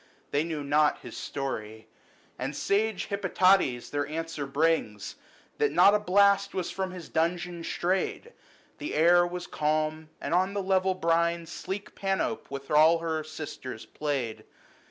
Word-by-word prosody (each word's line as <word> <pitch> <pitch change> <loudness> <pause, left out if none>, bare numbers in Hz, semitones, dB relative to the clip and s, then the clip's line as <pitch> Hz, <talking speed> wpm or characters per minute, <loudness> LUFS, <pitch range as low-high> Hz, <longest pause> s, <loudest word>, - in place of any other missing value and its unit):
They 145 - +2
knew 160 -3 -4
not 150 +1 +3
of - - -20
his - - -9
story; 110 -6 -5 0.5
And 135 +4 -3
sage 210 0 0
Hippotades 190 -9 +2
their 145 0 -1
answer 160 -2 -4
brings, 140 -8 0 0.5
That 440 -1 +2
not 200 - +6
a 210 - +4
blast 200 0 +3
was 185 -2 -2
from 190 -1 -3
his 180 -2 -8
dungeon 170 +1 -1
strayed: 190 - -2 0.5
The 300 - -4
air 175 +3 +5
was 175 0 -5
calm, 155 +1 -1
and - - -3
on 185 +3 +2
the 200 - -1
level 190 0 +2
brine 170 -1 +1
Sleek 190 +4 -6
Panopd 195 +3 -2
with 140 +1 -7
all 155 +3 +6
her 160 -1 -2
sisters 150 -6 -7
played. 125 -7 -3
165 Hz, 150 wpm, -28 LUFS, 150-190 Hz, 0.5 s, not